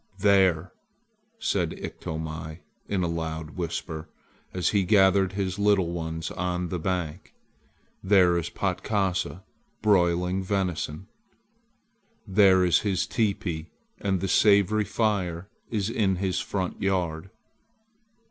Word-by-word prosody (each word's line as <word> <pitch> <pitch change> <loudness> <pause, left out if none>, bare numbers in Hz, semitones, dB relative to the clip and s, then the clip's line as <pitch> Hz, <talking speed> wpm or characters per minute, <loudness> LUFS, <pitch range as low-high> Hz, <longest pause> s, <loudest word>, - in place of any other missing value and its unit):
"There!" 95 -4 +3 0.6
said 100 - -1
Iktomi 80 +1 -6 0.3
in 95 -3 0
a - - +1
loud 80 -2 -4
whisper 80 -2 -5 0.4
as 90 -1 0
he 100 -2 +2
gathered 95 0 +4
his 95 -1 -2
little 100 -4 +3
ones 80 -1 -4
on 90 0 -2
the 90 - -3
bank. 90 -1 -3 0.7
"There 95 -3 +5
is 85 -1 -1
Patkasa 95 0 -1 0.4
broiling 90 -2 +2
venison! 95 -4 -2 1.2
There 95 -2 +5
is 90 - +4
his 95 -3 0
teepee, 95 -7 -2 0.3
and 95 -2 -1
the 95 - -1
savory 105 +1 +4
fire 100 -4 -1 0.2
is 105 -4 -1
in 105 -4 +1
his 95 0 -1
front 95 -3 -3
yard!" 90 -2 -1
95 Hz, 110 wpm, -26 LUFS, 85-100 Hz, 1.2 s, There